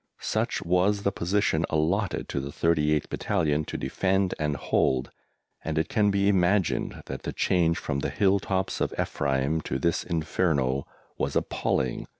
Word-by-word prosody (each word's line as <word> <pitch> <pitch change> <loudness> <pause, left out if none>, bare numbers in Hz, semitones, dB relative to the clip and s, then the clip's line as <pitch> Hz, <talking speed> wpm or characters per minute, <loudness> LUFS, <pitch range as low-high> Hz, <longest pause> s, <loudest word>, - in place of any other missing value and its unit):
Such - - -1
was 95 +4 +2
the 100 - +2
position 90 -3 +1
allotted 85 +6 0
to - - -1
the 70 +1 -5
38th 75 -1 +1
Battalion 80 -6 0
to - - -5
defend 95 +8 0
and 75 -1 0
hold, 65 -1 +1 0.5
and 80 0 -3
it 80 - 0
can 110 -6 +3
be 100 0 +2
imagined 95 -1 +1
that - - -6
the - - -4
change 85 -3 +2
from 70 - -2
the - - -1
hill 100 -1 +2
tops 95 -1 -2
of - - -1
Ephraim 70 +3 0
to 65 - -3
this 85 +5 0
inferno 75 -5 0 0.3
was - - -1
appalling. 65 -2 -1
85 Hz, 155 wpm, -27 LUFS, 75-95 Hz, 0.5 s, can